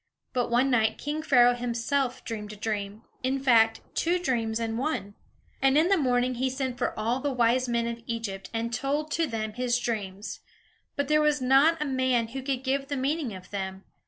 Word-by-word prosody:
But 245 -1 0
one 250 +3 +3
night, 220 -3 +2
king 300 +2 -3
Pharaoh 245 -5 +5
himself 245 +2 -1
dreamed 210 -2 -5
a - - -9
dream 210 0 -4 0.2
in 265 +1 0
fact, 225 -4 +4
two 345 +2 +1
dreams 235 -9 -1
in 225 -1 -2
one. 255 -7 -2 0.5
And 270 +1 +4
in 325 +4 +4
the 395 - +5
morning 250 -3 +2
he 260 +2 0
sent 260 -1 -3
for - - -1
all 230 +4 0
the 285 +1 -1
wise 250 0 +2
men 235 -1 +1
of 235 0 -4
Egypt, 205 -5 -4
and 230 +1 -2
told 290 +4 -1
to 330 0 +1
them 220 -3 -3
his 245 +1 0
dreams; 210 -4 -4 0.6
but 285 -1 -1
there 305 +1 +4
was 300 -1 +3
not 270 +6 +4
a 300 - -1
man 260 -4 +1
who 265 +3 -5
could 265 -1 -2
give 275 +1 0
the 285 - -2
meaning 275 -4 -1
of 185 -1 -12
them. 190 -1 -4
245 Hz, 200 wpm, -27 LUFS, 225-275 Hz, 0.6 s, Pharaoh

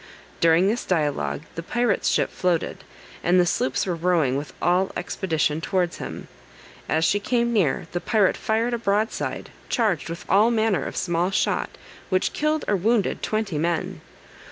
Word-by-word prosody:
During 165 +3 +4
this 230 +4 0
dialogue 150 -4 -1
the 165 - -5
pirate's 235 +4 0
ship - - +1
floated, 175 -3 -1 0.4
and 180 +1 +4
the 180 - +4
sloops 130 -5 0
were 185 - -1
rowing 165 -6 +1
with 145 +2 -4
all 180 +2 +2
expedition 160 -4 -1
towards 180 -2 0
him. - - -7 0.6
As 160 +1 +2
she 205 - +2
came 235 +2 0
near, 180 -11 +1
the 175 - -2
pirate 210 -3 +2
fired 225 +2 0
a 235 - -1
broadside, 215 0 -1 0.2
charged 210 - 0
with 170 +1 -6
all 205 +5 +5
manner 220 - +1
of - - -7
small 175 0 0
shot, 195 - 0 0.4
which 185 0 +1
killed 305 +1 0
or 205 - +2
wounded 215 +2 +1
twenty 215 -8 -1
men. 170 0 -2
185 Hz, 160 wpm, -24 LUFS, 165-220 Hz, 0.6 s, all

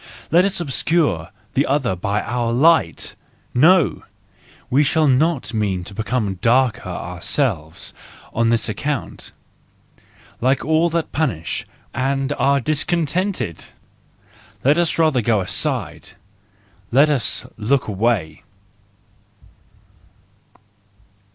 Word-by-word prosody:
Let 175 +4 +5
us 195 -1 0
obscure 145 - 0 0.2
the 140 - +1
other 135 -7 +1
by 100 +3 -2
our 120 -1 -1
light! 140 - +2 0.4
No! 165 +5 +4 0.7
We 140 +4 +3
do 155 +2 +2
not 140 -1 +1
mean 100 -5 -1
to 100 - -8
become 105 -2 -2
darker 120 -3 +2
ourselves 90 - -2 0.4
on 115 0 +2
his 115 -1 +1
account, 140 +5 -4 1.1
like 130 +3 +1
all 160 +2 +3
that 165 -1 -2
punish 120 - -2 0.3
and 135 +2 -1
are 140 0 +3
discontented! 155 - -1 1.0
Let 145 +5 +4
us 170 -2 +1
rather 155 -6 +3
go 110 -1 +2
aside! 95 - -2 0.8
Let 140 +5 +5
us 140 -5 0
look 125 +5 0
away 105 -5 -1
130 Hz, 100 wpm, -20 LUFS, 110-155 Hz, 1.1 s, Let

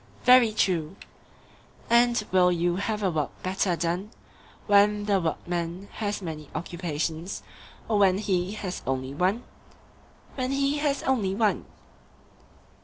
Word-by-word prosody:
Very 250 -3 +7
true. 180 -5 0 0.9
And 235 -1 +4
will 180 -1 +5
you 175 0 0
have 210 +1 -2
a 190 - +2
work 150 -3 -1
better 185 -1 0
done 175 +5 -2 0.6
when 205 0 +4
the 200 -2 +2
workman 170 +3 -3
has 205 -2 -3
many 155 -3 -6
occupations, 165 +1 -4 0.4
or 215 -2 +1
when 190 -2 +4
he 190 -2 -1
has 190 -4 -5
only 130 0 -2
one? 185 +10 0 0.9
When 255 -1 -2
he 280 +1 +1
has 290 -1 0
only 210 -8 +1
one. 215 -1 +1
190 Hz, 125 wpm, -26 LUFS, 170-215 Hz, 0.9 s, Very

